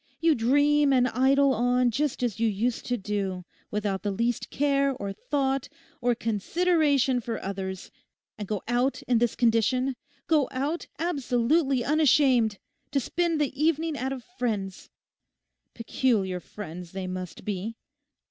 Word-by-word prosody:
You 330 Hz, -1 st, +4 dB
dream 285 Hz, +4 st, +3 dB
and 250 Hz, -2 st, +4 dB
idle 270 Hz, +3 st, +3 dB
on 245 Hz, +1 st, +2 dB
just 275 Hz, +1 st, -1 dB
as 225 Hz, -4 st, -1 dB
you 230 Hz, -, +3 dB
used 225 Hz, +3 st, -1 dB
to 245 Hz, -, 0 dB
do, 195 Hz, -3 st, -3 dB, 0.2 s
without 205 Hz, -2 st, -2 dB
the 205 Hz, -, -2 dB
least 230 Hz, +4 st, -1 dB
care 275 Hz, -1 st, +1 dB
or 200 Hz, -4 st, -5 dB
thought 270 Hz, +3 st, -1 dB, 0.3 s
or 245 Hz, 0 st, +2 dB
consideration 280 Hz, -, +1 dB
for 230 Hz, -1 st, -4 dB
others; 190 Hz, -1 st, -5 dB, 0.4 s
and 210 Hz, -2 st, -6 dB
go 210 Hz, -1 st, -3 dB
out 245 Hz, +3 st, 0 dB
in 245 Hz, -2 st, +2 dB
this 240 Hz, -1 st, +1 dB
condition—go 255 Hz, +5 st, +1 dB
out 285 Hz, +6 st, -2 dB
absolutely 275 Hz, -3 st, +1 dB
unashamed—to 275 Hz, -4 st, +2 dB
spend 335 Hz, +3 st, 0 dB
the 290 Hz, -3 st, 0 dB
evening 320 Hz, 0 st, +1 dB
at 265 Hz, -1 st, -2 dB
a 265 Hz, -2 st, -4 dB, 0.2 s
friend's. 200 Hz, -6 st, -3 dB, 0.9 s
Peculiar 220 Hz, -6 st, 0 dB
friends 180 Hz, -2 st, -9 dB
they 190 Hz, -1 st, -4 dB
must 185 Hz, -2 st, -6 dB
be. 210 Hz, +2 st, -3 dB
245 Hz, 135 wpm, -27 LUFS, 210-280 Hz, 0.9 s, You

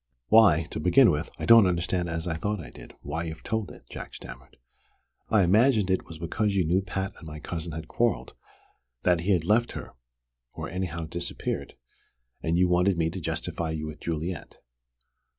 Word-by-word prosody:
"Why, 100 Hz, -8 st, +6 dB
to -, -, -4 dB
begin 110 Hz, -, +6 dB
with, 75 Hz, +2 st, -2 dB
that -, -, -11 dB
I -, -, -1 dB
don't 115 Hz, -4 st, +8 dB
understand 90 Hz, 0 st, 0 dB
as 80 Hz, +1 st, -3 dB
I 85 Hz, -, -1 dB
thought 105 Hz, +6 st, -2 dB
I 70 Hz, -8 st, -9 dB
did, -, -, -13 dB
why 80 Hz, +4 st, -3 dB
you've 80 Hz, -1 st, -7 dB
told 110 Hz, -2 st, -2 dB
it," -, -, -13 dB
Jack -, -, -8 dB
stammered. -, -, -11 dB, 0.7 s
"I 110 Hz, -3 st, +4 dB
imagined 105 Hz, +1 st, +4 dB
it 95 Hz, -, 0 dB
was 80 Hz, -, -9 dB
because 100 Hz, +5 st, -1 dB
you 95 Hz, -3 st, +2 dB
knew 90 Hz, +4 st, +2 dB
Pat 95 Hz, +1 st, -3 dB
and 80 Hz, -, -11 dB
my 75 Hz, 0 st, -7 dB
cousin 80 Hz, +1 st, -5 dB
had 80 Hz, +1 st, -6 dB
quarrelled, 120 Hz, -1 st, 0 dB, 0.7 s
that 90 Hz, -2 st, +3 dB
he 95 Hz, +4 st, 0 dB
had 85 Hz, -3 st, +1 dB
left 115 Hz, +5 st, +2 dB
her -, -, -7 dB, 0.6 s
or -, -, -5 dB
anyhow 85 Hz, -2 st, -3 dB
disappeared 85 Hz, +2 st, -4 dB, 0.7 s
and 80 Hz, +1 st, 0 dB
you 90 Hz, 0 st, +4 dB
wanted 90 Hz, +1 st, +3 dB
me 80 Hz, -1 st, +1 dB
to 95 Hz, -, -6 dB
justify 80 Hz, +1 st, -3 dB
you 80 Hz, -1 st, -3 dB
with 75 Hz, 0 st, -7 dB
Juliet." 85 Hz, +1 st, -4 dB
90 Hz, 190 wpm, -27 LUFS, 80-100 Hz, 0.7 s, don't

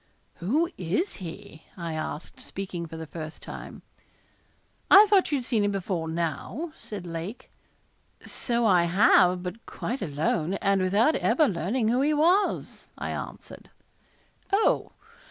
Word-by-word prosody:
'Who 275 Hz, -, +1 dB
is 190 Hz, -, -1 dB
he?' 180 Hz, -2 st, -9 dB, 0.2 s
I 170 Hz, -2 st, -4 dB
asked, 155 Hz, 0 st, -5 dB
speaking 185 Hz, -3 st, -6 dB
for 160 Hz, 0 st, -8 dB
the 160 Hz, -, -6 dB
first 155 Hz, 0 st, -8 dB
time. -, -, -9 dB, 1.1 s
'I 400 Hz, +3 st, +10 dB
thought 400 Hz, -5 st, +3 dB
you 290 Hz, -, +2 dB
had 250 Hz, -, -5 dB
seen 230 Hz, -5 st, +1 dB
him 205 Hz, -, +2 dB
before 185 Hz, -4 st, -2 dB
now,' 170 Hz, -, -3 dB
said 200 Hz, -4 st, -7 dB
Lake. 170 Hz, +7 st, -6 dB, 0.7 s
'So 235 Hz, -1 st, -1 dB
I 180 Hz, -5 st, +5 dB
have, 180 Hz, 0 st, +4 dB
but 185 Hz, +5 st, -6 dB
quite 255 Hz, +3 st, -4 dB
alone, 160 Hz, +2 st, -1 dB
and 195 Hz, -1 st, +1 dB
without 205 Hz, +11 st, +3 dB
ever 310 Hz, -3 st, +3 dB
learning 215 Hz, +5 st, 0 dB
who 245 Hz, +3 st, +2 dB
he 300 Hz, +2 st, +2 dB
was,' 350 Hz, +7 st, +1 dB
I -, -, -4 dB
answered. -, -, -8 dB, 0.8 s
'Oh! 400 Hz, +3 st, +2 dB
195 Hz, 140 wpm, -27 LUFS, 170-255 Hz, 1.1 s, I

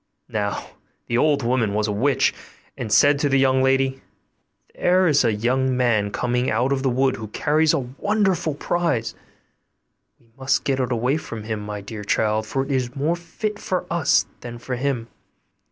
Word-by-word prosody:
Now 100 Hz, -2 st, -2 dB, 0.4 s
the 120 Hz, 0 st, 0 dB
old 145 Hz, -2 st, +2 dB
woman 115 Hz, -4 st, +1 dB
was 105 Hz, 0 st, +1 dB
a -, -, -1 dB
witch, 130 Hz, +7 st, +2 dB, 0.4 s
and 110 Hz, -3 st, -5 dB
said 145 Hz, +5 st, +5 dB
to 145 Hz, -, +1 dB
the 135 Hz, -, +3 dB
young 130 Hz, -1 st, +3 dB
lady, 135 Hz, 0 st, +1 dB, 0.7 s
'There 185 Hz, +1 st, +3 dB
is 145 Hz, -3 st, +4 dB
a -, -, +3 dB
young 125 Hz, +4 st, 0 dB
man 115 Hz, -5 st, +2 dB
coming 125 Hz, +4 st, -1 dB
out 120 Hz, +5 st, +1 dB
of 135 Hz, -, -1 dB
the 135 Hz, -, +1 dB
wood 130 Hz, +1 st, +1 dB
who 110 Hz, -, -6 dB
carries 150 Hz, +8 st, +2 dB
a -, -, +2 dB, 0.2 s
wonderful 190 Hz, -7 st, +1 dB
prize; 165 Hz, -7 st, -1 dB, 1.1 s
we 115 Hz, -1 st, -29 dB
must 135 Hz, 0 st, 0 dB
get 135 Hz, -1 st, 0 dB
it 130 Hz, -1 st, -1 dB
away 125 Hz, +5 st, +1 dB
from 115 Hz, -8 st, -7 dB
him, 110 Hz, 0 st, -3 dB
my 105 Hz, 0 st, -6 dB
dear 105 Hz, +1 st, -8 dB
child, 110 Hz, +1 st, 0 dB
for 135 Hz, +3 st, -1 dB
it 140 Hz, -, -6 dB
is 125 Hz, -2 st, -1 dB
more 150 Hz, +5 st, 0 dB
fit 205 Hz, +5 st, -5 dB
for 185 Hz, -, -2 dB
us 170 Hz, -4 st, +3 dB
than 120 Hz, -1 st, -8 dB
for 125 Hz, +2 st, -5 dB
him. 125 Hz, -2 st, -2 dB
130 Hz, 185 wpm, -22 LUFS, 115-145 Hz, 1.1 s, said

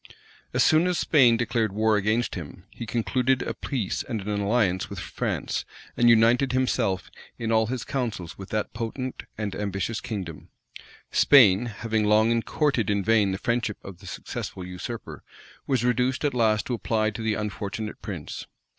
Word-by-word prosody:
As -, -, +3 dB
soon 160 Hz, +3 st, +4 dB
as 180 Hz, -2 st, +1 dB
Spain 125 Hz, -7 st, +5 dB
declared 115 Hz, -2 st, 0 dB
war 110 Hz, +1 st, +3 dB
against 110 Hz, +4 st, +1 dB
him, 90 Hz, +1 st, -8 dB
he 115 Hz, -, -7 dB
concluded 125 Hz, +3 st, +1 dB
a -, -, -3 dB
peace 120 Hz, -9 st, -2 dB
and 115 Hz, -, -4 dB
an 100 Hz, -, -6 dB
alliance 100 Hz, -3 st, +1 dB
with -, -, -7 dB
France, -, -, -3 dB, 0.3 s
and 120 Hz, 0 st, +5 dB
united 120 Hz, +3 st, +4 dB
himself 115 Hz, -7 st, 0 dB, 0.3 s
in 115 Hz, 0 st, -2 dB
all 110 Hz, -1 st, +3 dB
his 125 Hz, -1 st, -3 dB
counsels 115 Hz, -10 st, -3 dB
with 95 Hz, -, -10 dB
that 110 Hz, -1 st, -2 dB
potent 130 Hz, +3 st, -4 dB
and 105 Hz, -2 st, -3 dB
ambitious 100 Hz, +2 st, -2 dB
kingdom. 95 Hz, -8 st, -6 dB, 0.6 s
Spain, 120 Hz, -5 st, +6 dB
having 110 Hz, 0 st, -1 dB
long 110 Hz, +2 st, +4 dB
courted 135 Hz, -, 0 dB
in 100 Hz, -1 st, +1 dB
vain 105 Hz, -2 st, +3 dB
the 95 Hz, -, -2 dB
friendship 120 Hz, -1 st, -1 dB
of 95 Hz, -3 st, -10 dB
the -, -, -12 dB
successful 90 Hz, -, -6 dB
usurper, 90 Hz, +6 st, -7 dB, 0.5 s
was 125 Hz, -3 st, +1 dB
reduced 125 Hz, +4 st, +1 dB
at 145 Hz, -, +1 dB
last 110 Hz, -3 st, +2 dB
to 125 Hz, -, -2 dB
apply 110 Hz, -2 st, 0 dB
to 105 Hz, -, -7 dB
the 110 Hz, -1 st, 0 dB
unfortunate 105 Hz, +1 st, -4 dB
prince. 85 Hz, -8 st, -6 dB
110 Hz, 165 wpm, -26 LUFS, 100-120 Hz, 0.6 s, Spain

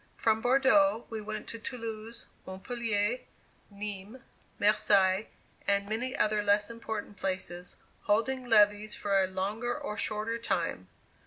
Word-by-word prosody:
From 220 Hz, -1 st, +2 dB
Bordeaux 270 Hz, 0 st, +4 dB
we 220 Hz, -1 st, -4 dB
went 215 Hz, 0 st, -5 dB
to 230 Hz, -, -6 dB
Toulouse, 230 Hz, -2 st, -6 dB, 0.2 s
Montpellier, 225 Hz, +3 st, -1 dB, 0.5 s
Nismes, 205 Hz, +3 st, -7 dB, 0.4 s
Marseilles, 200 Hz, -1 st, +3 dB, 0.4 s
and 200 Hz, 0 st, +2 dB
many 235 Hz, +5 st, -2 dB
other 215 Hz, 0 st, +2 dB
less 205 Hz, +1 st, +2 dB
important 220 Hz, -3 st, -6 dB
places, 185 Hz, -2 st, -3 dB, 0.3 s
holding 250 Hz, +5 st, +1 dB
levees 210 Hz, -2 st, +4 dB
for 195 Hz, -1 st, +2 dB
a -, -, 0 dB
longer 205 Hz, +6 st, -2 dB
or 210 Hz, -, -5 dB
shorter 225 Hz, +1 st, -1 dB
time. 170 Hz, -, -2 dB
215 Hz, 120 wpm, -30 LUFS, 200-230 Hz, 0.5 s, Bordeaux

